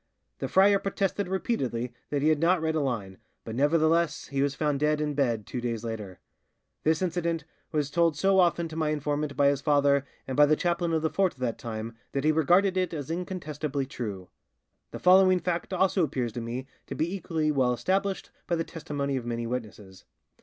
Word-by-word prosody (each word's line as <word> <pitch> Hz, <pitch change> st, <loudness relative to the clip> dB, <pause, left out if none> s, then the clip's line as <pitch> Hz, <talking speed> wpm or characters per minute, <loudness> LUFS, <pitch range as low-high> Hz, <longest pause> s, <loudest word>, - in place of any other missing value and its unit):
The -, -, -2 dB
friar 200 Hz, +1 st, +5 dB
protested 195 Hz, 0 st, -1 dB
repeatedly 130 Hz, -, -2 dB, 0.2 s
that 145 Hz, -1 st, -1 dB
he 155 Hz, -, +4 dB
had 155 Hz, -2 st, +3 dB
not 175 Hz, +3 st, +3 dB
read 160 Hz, 0 st, 0 dB
a 160 Hz, -, +1 dB
line, 110 Hz, -9 st, -3 dB, 0.3 s
but 110 Hz, -, -5 dB
nevertheless 160 Hz, +5 st, +2 dB
he 140 Hz, -1 st, -1 dB
was 140 Hz, 0 st, 0 dB
found 150 Hz, -3 st, 0 dB
dead 150 Hz, +1 st, +2 dB
in 150 Hz, -1 st, -1 dB
bed 120 Hz, -7 st, 0 dB
two 125 Hz, -, -5 dB
days 115 Hz, -2 st, -3 dB
later. 105 Hz, -6 st, -6 dB, 0.6 s
This 160 Hz, +3 st, +1 dB
incident 170 Hz, -3 st, -1 dB, 0.3 s
was 150 Hz, -3 st, -1 dB
told 165 Hz, -3 st, +2 dB
so 190 Hz, +4 st, +3 dB
often 170 Hz, -1 st, +3 dB
to 160 Hz, -, -8 dB
my 160 Hz, -1 st, 0 dB
informant 150 Hz, -1 st, -2 dB
by 140 Hz, -1 st, +5 dB
his 140 Hz, -1 st, 0 dB
father 140 Hz, -2 st, +3 dB, 0.2 s
and 130 Hz, -, -3 dB
by 145 Hz, 0 st, +6 dB
the 155 Hz, -, +4 dB
chaplain 170 Hz, +1 st, 0 dB
of 160 Hz, -1 st, +1 dB
the 160 Hz, -, +1 dB
fort 190 Hz, -2 st, +1 dB
of -, -, -23 dB
that 120 Hz, -3 st, -2 dB
time 115 Hz, 0 st, -5 dB, 0.2 s
that 140 Hz, -, -1 dB
he 155 Hz, -, +4 dB
regarded 180 Hz, +5 st, +3 dB
it 185 Hz, -2 st, 0 dB
as 145 Hz, 0 st, -5 dB
incontestably 155 Hz, -5 st, -3 dB
true. 105 Hz, -8 st, -6 dB, 0.6 s
The -, -, -7 dB
following 185 Hz, 0 st, +5 dB
fact 175 Hz, +1 st, -2 dB
also 190 Hz, 0 st, +2 dB
appears 125 Hz, -7 st, -2 dB
to 120 Hz, -, -4 dB
me 120 Hz, +3 st, -4 dB, 0.2 s
to -, -, -5 dB
be 170 Hz, +4 st, -1 dB
equally 160 Hz, -4 st, -1 dB
well 130 Hz, -4 st, +2 dB
established 190 Hz, +9 st, -1 dB, 0.2 s
by 170 Hz, -, +1 dB
the 165 Hz, -, -1 dB
testimony 140 Hz, -4 st, -3 dB
of 125 Hz, -, -5 dB
many 115 Hz, 0 st, -2 dB
witnesses. 110 Hz, -5 st, -6 dB
150 Hz, 205 wpm, -27 LUFS, 130-170 Hz, 0.6 s, by